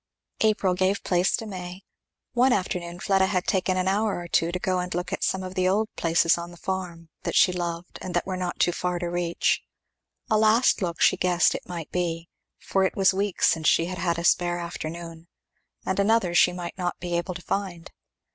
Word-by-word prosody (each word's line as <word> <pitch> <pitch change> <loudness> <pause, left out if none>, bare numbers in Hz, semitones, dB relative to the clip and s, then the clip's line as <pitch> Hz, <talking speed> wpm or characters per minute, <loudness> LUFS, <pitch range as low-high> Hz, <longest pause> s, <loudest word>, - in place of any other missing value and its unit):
April 210 -4 +2
gave 190 +2 0
place 180 0 +2
to 225 - -6
May. 185 -2 -7 0.5
One 250 +1 +4
afternoon 175 -2 -3
Fleda 190 0 +2
had 185 -1 -1
taken 185 -1 +1
an 185 0 0
hour 205 +1 +1
or 175 0 -6
two 170 0 +1
to 180 - -2
go 185 0 -1
and 180 0 -4
look 180 +1 -3
at - - -3
some 190 0 0
of 185 0 -6
the 185 -1 +1
old 215 +3 +1
places 165 0 +2
on 170 0 -6
the 175 - -13
farm, 175 -3 -5
that - - -3
she 180 - +5
loved 170 -1 -5
and 180 -2 -5
that 175 - +1
were 190 - -3
not 180 -1 -4
too 175 - +3
far 180 0 -2
to 175 0 -3
reach. 175 -1 0 0.7
A 215 -4 +2
last 220 +1 +4
look 170 -2 -2
she - - +5
guessed 180 -1 +3
it - - -7
might 170 -3 -6
be, 170 -2 -2 0.3
for 195 - 0
it 190 - 0
was 195 -1 +4
weeks 195 0 +1
since 160 -2 0
she 165 - +4
had 180 0 -5
had 170 -2 0
a 170 - -3
spare 175 0 +2
afternoon, 170 -1 -7 0.6
and 190 - -1
another 200 -3 +2
she 180 - +5
might 175 +1 -7
not 175 -1 -1
he 175 -1 -3
able 175 +1 -2
to 180 - -7
find. 185 -4 -4
180 Hz, 215 wpm, -25 LUFS, 175-190 Hz, 0.7 s, she